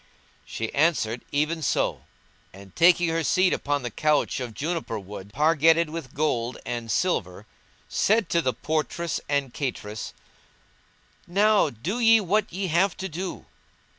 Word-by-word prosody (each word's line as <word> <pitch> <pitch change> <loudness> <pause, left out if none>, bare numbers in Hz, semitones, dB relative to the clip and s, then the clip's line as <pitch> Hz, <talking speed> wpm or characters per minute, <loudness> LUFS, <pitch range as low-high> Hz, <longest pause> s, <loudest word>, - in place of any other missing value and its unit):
"[FN#176] - - -33
She 115 0 -4
answered, 140 -7 +1
"Even 155 +3 0
so"; 130 - 0 0.5
and, 95 -1 -14
taking 175 0 +5
her 165 0 0
seat 185 +4 +3
upon 145 -2 -1
the 120 - -4
couch 150 +6 +1
of 120 -4 -6
juniper 160 -7 -3
wood, 100 0 -9
pargetted 160 +4 +3
with 160 -6 -7
gold 130 -5 -1
and 120 -1 -4
silver, 105 - -1 0.4
said 220 +1 +2
to 170 - +2
the 130 - +1
portress 160 +4 -2
and 140 -3 0
cateress, 110 -6 -5 1.1
"Now 205 0 +3
do 160 - -4
ye 225 -1 +6
what 210 +2 0
ye 190 +3 -3
have 180 +3 +1
to 190 - -4
do." 180 +2 -6
155 Hz, 145 wpm, -25 LUFS, 120-175 Hz, 1.1 s, ye